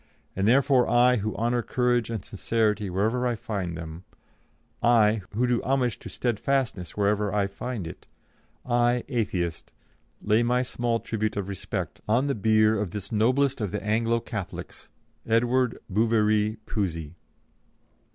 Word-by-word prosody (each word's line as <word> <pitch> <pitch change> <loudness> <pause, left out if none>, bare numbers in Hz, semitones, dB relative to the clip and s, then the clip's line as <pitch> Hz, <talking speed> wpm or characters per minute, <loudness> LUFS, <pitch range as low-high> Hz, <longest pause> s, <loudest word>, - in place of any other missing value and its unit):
And 95 +2 +1
therefore 130 +1 +4
I, 125 +2 +5
who 110 0 -3
honour 120 +2 0
courage 120 -1 +1
and 110 -6 -4
sincerity 105 0 0
wherever 110 +7 0
I 120 - 0
find 95 -6 -4
them; 80 +1 -8 0.8
I, 110 -2 +4
who 120 +3 +2
do 120 -1 +1
homage 130 -3 0
to - - -9
steadfastness 120 -5 -1
wherever 105 0 +1
I 105 0 +1
find 100 +1 -5
it; 80 - -10 0.6
I, 120 0 +2
Atheist, 95 - -2 0.5
lay 110 +2 +2
my 125 +1 +2
small 120 -2 -1
tribute 110 -2 -2
of 100 -2 -2
respect 100 -2 -5
on 120 +6 +2
the 140 - 0
bier 110 -1 +3
of 105 - -2
this 100 +2 -6
noblest 130 +5 +2
of 105 - -1
the 105 +3 -4
Anglo 115 +2 +1
Catholics, 105 -5 -7 0.4
Edward 120 +2 +2
Bouverie 110 0 +2
Pusey." 85 -7 -3
110 Hz, 140 wpm, -26 LUFS, 105-120 Hz, 0.8 s, I